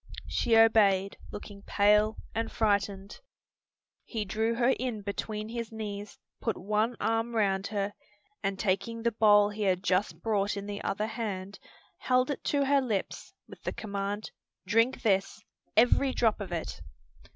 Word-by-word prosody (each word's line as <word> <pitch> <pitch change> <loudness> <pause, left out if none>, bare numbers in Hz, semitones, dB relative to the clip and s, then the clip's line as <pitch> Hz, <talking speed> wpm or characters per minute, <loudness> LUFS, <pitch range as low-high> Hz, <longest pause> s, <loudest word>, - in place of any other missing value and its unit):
She 230 -2 +2
obeyed, 200 -4 +4
looking 205 -1 -9
pale 210 +2 +3 0.2
and 225 0 -2
frightened. 200 - 0 0.8
He 220 -3 -4
drew 220 +3 0
her 240 +1 +3
in 240 -5 -3
between 210 +1 -4
his 230 -1 -5
knees, 210 -2 -6 0.2
put 225 -4 -1
one 215 +5 0
arm 225 +1 0
round 195 -3 +1
her, 205 -1 -2 0.5
and 195 -2 -1
taking 205 +4 -1
the 235 - +2
bowl 205 -2 +5
he 210 +1 -7
had 190 -2 +1
just 185 +2 +1
brought 205 -2 0
in 200 - -5
the 205 0 -5
other 210 +2 -1
hand, 200 -4 -5 0.4
held 255 +2 +2
it 285 - -5
to 285 -1 +2
her 280 0 +4
lips, 220 -7 -3 0.2
with - - -13
the - - -3
command, 200 0 -4 0.3
"Drink 230 +4 +2
this! 195 0 +1 0.4
every 250 +3 +4
drop 225 -3 +2
of 195 - -6
it!" 170 -2 -4
210 Hz, 150 wpm, -29 LUFS, 200-225 Hz, 0.8 s, bowl